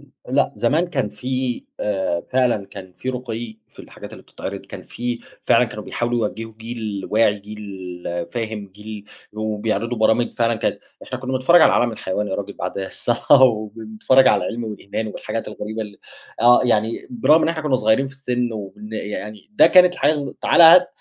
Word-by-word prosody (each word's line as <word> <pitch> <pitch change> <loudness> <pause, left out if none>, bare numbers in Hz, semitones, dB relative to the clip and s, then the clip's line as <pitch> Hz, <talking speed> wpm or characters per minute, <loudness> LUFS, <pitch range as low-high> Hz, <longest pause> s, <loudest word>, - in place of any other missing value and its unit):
امم، - - -21 0.2
لأ - - +1
زمان 140 +11 +1
كان 135 -10 -2
في 125 +4 -3 0.2
آآ، 95 -4 -1
فعلًا 125 -6 +1
كان 95 -2 -11
في 130 - -8
رُقيّ 120 -3 -6
في - - -26
الحاجات - - -11
اللي - - -11
بتتعرض، - - -7
كان - - -9
في 120 0 -5 0.2
فعلًا - - +4
كانوا - - -8
بيحاولوا 120 -2 -1
يوجّهوا 115 +1 -8
جيل 110 -4 -5
واعي، 105 -1 +3
جيل 100 -4 -9 0.3
فاهم، 110 -2 -4
جيل 105 +1 -10 0.3
وبيعرضوا 110 +2 -2
برامج 110 +2 +2
فعلًا 115 0 +1
كانت - - -2 0.2
إحنا 130 - -6
كنا 130 0 -5
بنتفرج 130 +7 +5
على - - +6
عالم 120 - +2
الحيوان 105 -1 -3
يا 95 - -2
راجل 100 0 -4
بعد 90 +1 -5
الصلاة، 120 +7 +2
وبنتفرج 110 +2 +3
على - - +3
العلم 120 0 -4
والإيمان 110 0 -5
والحاجات 110 +1 -5
الغريبة 105 +1 -5
ال 105 -2 -11 0.4
آه 120 +1 +6
يعني 115 -1 0
برغم 165 -10 +4
إن - - +2
إحنا 160 -2 -2
كنا 140 -4 +2
صغيرين 110 +4 +2
في 135 - -13
السن 125 -3 -2
وإن 105 0 -8
يعني 105 - -6
ده 210 - +6
كانت 180 -1 +6
الحياة 150 -1 +2
و 140 - -5
تعالى 170 - +5
هات 175 +2 +9
115 Hz, 180 wpm, -21 LUFS, 105-125 Hz, 0.4 s, هات